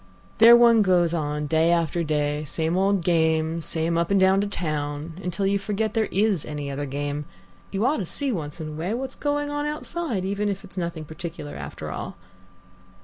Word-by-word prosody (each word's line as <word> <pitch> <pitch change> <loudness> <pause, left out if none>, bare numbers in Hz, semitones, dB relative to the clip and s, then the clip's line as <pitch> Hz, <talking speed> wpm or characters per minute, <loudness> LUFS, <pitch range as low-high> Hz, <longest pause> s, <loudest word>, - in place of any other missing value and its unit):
There 230 +1 +10
one 235 -2 +6
goes 175 -4 +3
on 150 -2 -1
day 160 +2 +2
after 170 0 +1
day, 150 -1 0
same 160 +3 -1
old 195 -1 +2
game, 160 -1 +2
same 165 +1 -1
up 170 - 0
and 200 -1 +3
down 190 +1 +4
to 205 - -1
town, 155 -2 -3
until 180 +2 -1
you 200 +1 +2
forget 210 +2 -2
there 220 -2 +1
is 200 -4 +2
any 145 -2 -5
other 145 +1 -3
game. 145 +2 -3 0.4
You 200 +3 -1
ought 290 +4 +2
to 190 - -3
see 280 - -2
once 155 -7 -4
in 155 -1 -5
a - - -7
way 170 +8 -2
what's 265 +2 -4
going 290 0 -1
on 290 0 -1
outside, 300 - -3
if 200 +1 -2 0.2
it's 200 - -14
only 180 -2 -1
nothing 165 -2 -7
particular 160 -1 -7
after - - -6
all." - - -6
170 Hz, 200 wpm, -25 LUFS, 155-205 Hz, 0.4 s, There